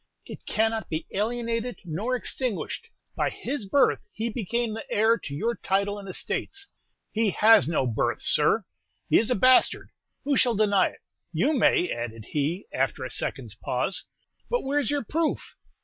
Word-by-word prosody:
It - - -11
cannot 220 -2 0
be 160 0 -3
alienated 230 +2 -2
nor 200 +10 -2
extinguished; 250 -2 -1 0.3
by - - +1
his 275 -8 -4
birth 280 +8 +3
he 225 +2 -3
became 235 +1 -2
the 225 - -7
heir 220 +2 +4
to 140 - -7
your 230 +10 0
title 200 -1 -1
and 195 -1 -9
estates." 395 - -2 0.4
"He 220 -1 +1
has 210 - +6
no 155 -5 +1
birth, 115 -3 0
sir, - - +3 0.5
he - - +7
is 225 - 0
a 250 - +3
bastard: 255 +5 +4 0.3
who 280 -1 +1
shall 240 -3 +3
deny 200 -2 +3
it? - - -18 0.3
You 210 - +1
may," 205 - +3
added 115 -2 -5
he, 155 +6 -1
after - - -1
a - - -6
second's - - -3
pause; - - -2 0.4
"but - - 0
where's 280 -2 0
your 290 -2 0
proof? 320 +6 -2
220 Hz, 165 wpm, -26 LUFS, 190-250 Hz, 0.5 s, he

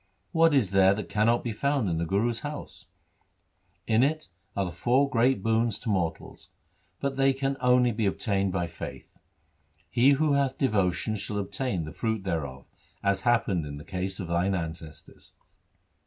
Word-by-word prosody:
What 165 -1 +4
is 110 -9 +2
there 95 0 +5
that 105 - -6
cannot 115 +3 +2
be 120 - -2
found 140 +1 0
in 85 -2 -1
the 85 - -2
Guru's 115 +6 0
house? 145 +2 -8 1.0
In 110 +1 +3
it 155 +4 0 0.3
are 100 - 0
the 90 - -4
four 125 +11 +2
great 125 -4 +2
boons 115 -1 +1
to 115 - -5
mortals, 90 -5 -3 0.5
but 140 -1 -2
they 135 0 +4
can 135 +1 -1
only 125 -1 +4
be 110 -1 0
obtained 100 -1 0
by 90 -2 -1
faith. 85 -1 -9 0.8
He 130 +4 +5
who 150 +1 +2
hath 140 -1 +1
devotion 105 -3 0
shall 105 +1 -4
obtain 100 -1 -2
the 75 - -7
fruit 110 +1 -2
thereof, 75 -8 -4 0.4
as 100 -1 +1
happened 115 -7 +1
in 70 -1 -7
the 75 - -10
case 95 +1 -4
of 90 - -4
thine 90 +3 +1
ancestors.' 80 -2 -8
105 Hz, 170 wpm, -27 LUFS, 95-125 Hz, 1.0 s, there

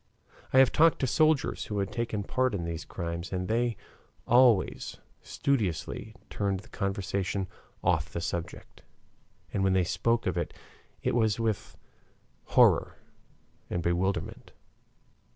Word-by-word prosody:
I - - +3
have 130 -1 +7
talked 165 +1 +5
to - - +3
soldiers 155 +2 +2
who 105 - -4
had 100 -1 -1
taken 115 -3 -2
part 130 +2 0
in 85 -4 -3
these 85 -1 -4
crimes, 85 0 -5
and 90 -1 -2
they 115 +1 0 0.5
always 120 -5 +3 0.2
studiously 105 - -2
turned 100 -2 -2
the 115 - -18
conversation 95 -1 -2 0.4
off 80 -3 +2
the 85 - -3
subject, 85 0 -5 0.7
and 100 - 0
when 95 -1 +3
they 95 -1 +3
spoke 115 +7 0
of - - -1
it - - -4 0.5
it - - +1
was 110 -2 +2
with 110 -3 -2 0.7
horror - - +4 0.7
and 85 - -2
bewilderment. 90 +3 -1
100 Hz, 135 wpm, -29 LUFS, 90-120 Hz, 0.7 s, have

